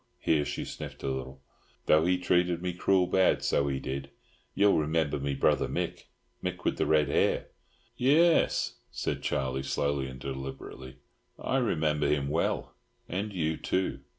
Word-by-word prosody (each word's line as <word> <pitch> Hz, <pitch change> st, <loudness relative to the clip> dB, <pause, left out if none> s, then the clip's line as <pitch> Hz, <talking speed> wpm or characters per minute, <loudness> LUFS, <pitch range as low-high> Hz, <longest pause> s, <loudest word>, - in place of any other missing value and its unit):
—here 75 Hz, -2 st, +2 dB
she -, -, -4 dB
sniffed -, -, -8 dB
a -, -, -2 dB
little—"though 65 Hz, +4 st, -2 dB
he 90 Hz, 0 st, +3 dB
treated 90 Hz, -1 st, +2 dB
me 90 Hz, 0 st, -3 dB
cruel 90 Hz, +1 st, +3 dB
bad, 95 Hz, +1 st, +3 dB
so 70 Hz, -, +2 dB
he 70 Hz, -1 st, -1 dB
did! 70 Hz, +1 st, -5 dB, 0.5 s
Ye'll 100 Hz, -4 st, +4 dB
remember 80 Hz, -1 st, 0 dB
me 70 Hz, 0 st, -2 dB
brother -, -, +2 dB
Mick—Mick 90 Hz, -1 st, -5 dB
with -, -, 0 dB
the -, -, +2 dB
red 75 Hz, -2 st, +4 dB
hair?" -, -, +1 dB, 0.5 s
"Yes," 160 Hz, +6 st, +3 dB
said -, -, -3 dB
Charlie, 65 Hz, 0 st, -1 dB
slowly 70 Hz, 0 st, -1 dB
and 65 Hz, 0 st, -9 dB
deliberately, 65 Hz, -1 st, -7 dB, 0.4 s
"I 135 Hz, -, -1 dB
remember 80 Hz, -, +1 dB
him 70 Hz, -2 st, +1 dB
well; 80 Hz, +3 st, -1 dB, 0.3 s
and 100 Hz, +4 st, -3 dB
you 80 Hz, -4 st, -1 dB
too. 95 Hz, 0 st, -1 dB
75 Hz, 150 wpm, -29 LUFS, 70-90 Hz, 0.5 s, Ye'll